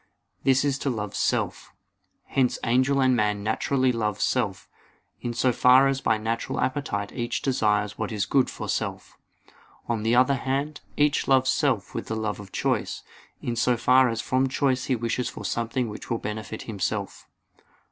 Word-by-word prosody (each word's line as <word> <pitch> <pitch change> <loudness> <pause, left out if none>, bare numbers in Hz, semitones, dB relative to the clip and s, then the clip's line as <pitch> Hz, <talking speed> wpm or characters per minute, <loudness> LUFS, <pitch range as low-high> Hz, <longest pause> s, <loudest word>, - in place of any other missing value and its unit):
This 135 +1 +3
is 135 -2 0
to 140 - -1
love 105 -4 -3
self. - - -1 0.5
Hence 130 -3 +1
angel 130 +4 +2
and 130 -1 +4
man 105 -3 0
naturally 130 +4 +1
love 110 -4 -2
self, 105 -8 -1 0.5
in 120 - -2
so 125 +1 +2
far 130 +3 +6
as 135 0 0
by 110 - +2
natural 115 +2 -3
appetite 130 -8 -2
each 120 -1 -3
desires 105 -6 +1
what 110 0 -2
is 105 -3 -1
good 135 -2 +2
for - - -6
self. - - -3 0.7
On 115 -2 -1
the 115 +2 +2
other 130 +2 +4
hand, 140 +4 -2 0.2
each 150 0 +2
loves 130 -1 +4
self - - 0
with - - -4
the 110 - -2
love 110 -2 -2
of 100 -2 -11
choice, - - -1 0.4
in 120 - -2
so 120 +1 +2
far 125 +2 +5
as 115 -1 -2
from 130 +1 +1
choice 130 -1 0
he 130 - +1
wishes 120 +1 -2
for - - -8
something 115 +1 -1
which 105 0 -8
will 115 - 0
benefit 110 0 -5
himself. 100 -5 -4
120 Hz, 175 wpm, -25 LUFS, 110-130 Hz, 0.7 s, far